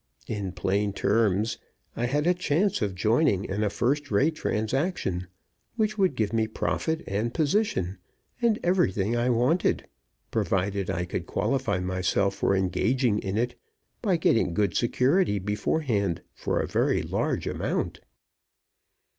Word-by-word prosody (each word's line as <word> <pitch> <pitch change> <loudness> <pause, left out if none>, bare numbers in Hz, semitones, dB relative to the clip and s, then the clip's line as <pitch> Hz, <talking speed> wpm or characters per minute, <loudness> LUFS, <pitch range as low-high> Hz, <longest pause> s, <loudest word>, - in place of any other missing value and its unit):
In 100 -4 -3
plain 100 +2 0
terms, 110 0 +1 0.4
I 120 - 0
had 145 +4 0
a 180 - +4
chance 180 +2 +1
of 100 -3 -1
joining 110 - +2
in 100 +3 -2
a 105 - +2
first 140 +7 0
rate 135 +10 +3
transaction, 110 - -1 0.5
which 215 -2 0
would 190 -8 +2
give 110 -3 -1
me 110 -1 +2
profit, 160 +8 -2
and 105 +4 -1
position, 145 - 0 0.4
and 230 -3 +3
everything 115 - +2
I 120 +1 +1
wanted, 125 +9 +2 0.5
provided 95 0 0
I 90 - -1
could - - -4
qualify 120 -9 0
myself 95 +2 0
for 100 - +1
engaging 105 +5 +1
in 95 0 -3
it 120 +2 0 0.5
by 195 -7 +2
getting 115 - +2
good 100 -1 +1
security 125 - +2
beforehand 105 - -1
for - - -1
a - - 0
very - - +1
large - - -1
amount. - - -2
110 Hz, 140 wpm, -27 LUFS, 100-150 Hz, 0.5 s, a